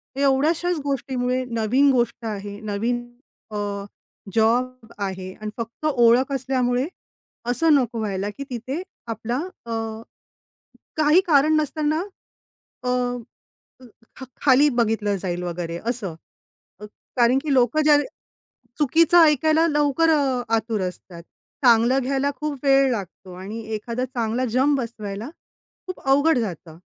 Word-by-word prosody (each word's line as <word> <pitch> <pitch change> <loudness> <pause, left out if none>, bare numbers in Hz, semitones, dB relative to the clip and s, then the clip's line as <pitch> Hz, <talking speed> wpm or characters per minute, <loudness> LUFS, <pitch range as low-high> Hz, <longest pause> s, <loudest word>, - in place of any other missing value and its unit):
एवढ्याशाच 305 +6 +2
गोष्टीमुळे, 255 -2 -1
नवीन 245 +4 +2
गोष्ट 240 -2 0
आहे, 205 -1 -5
नवीन 225 +3 -2 0.5
अ, - - -6 0.8
जॉब 235 +1 +1
आहे 190 -1 -4
आणि 215 +2 -7
फक्त 230 +6 -6
ओळख 250 -1 +4
असल्यामुळे, 255 0 0 0.6
असं 305 +6 +3
नको 245 -4 +1
व्हायला, 200 -1 -2
की 280 +7 -7
तिथे 255 +7 -4 0.3
आपला 230 +2 -3 0.3
अ, 230 - -7 1.3
काही 310 +4 +5
कारण 305 0 +4
नसताना, 310 +1 0 0.8
अ, 250 - -1 1.3
ख 265 - -9 0.2
खाली 280 +2 +5
बघितलं 220 -4 0
जाईल 180 -1 -3
वगैरे 170 -1 -4
असं. 220 -9 -3 0.6
अ, 210 - -8 0.3
कारण 245 +2 +4
की 295 - 0
लोकं 255 +4 +3
ज्या 300 -1 +6 0.8
चुकीचं 325 +4 +4
ऐकायला, 315 +2 +3
लवकर 295 +1 +2
अ, 270 -5 +1
आतुर 220 -2 -1
असतात. 175 -1 -10 0.4
चांगलं 240 +3 +5
घ्यायला 275 +2 0
खूप 300 -2 -3
वेळ 275 -1 +4
लागतो 190 -3 -6
आणि 195 +5 -7
एखादा 235 +4 -3
चांगला 240 0 -2
जम 260 +5 +2
बसवायला 225 -2 -5 0.6
खूप 370 - -6
अवघड 285 +2 +4
जातं. 170 -7 -5
245 Hz, 120 wpm, -23 LUFS, 220-280 Hz, 1.3 s, ज्या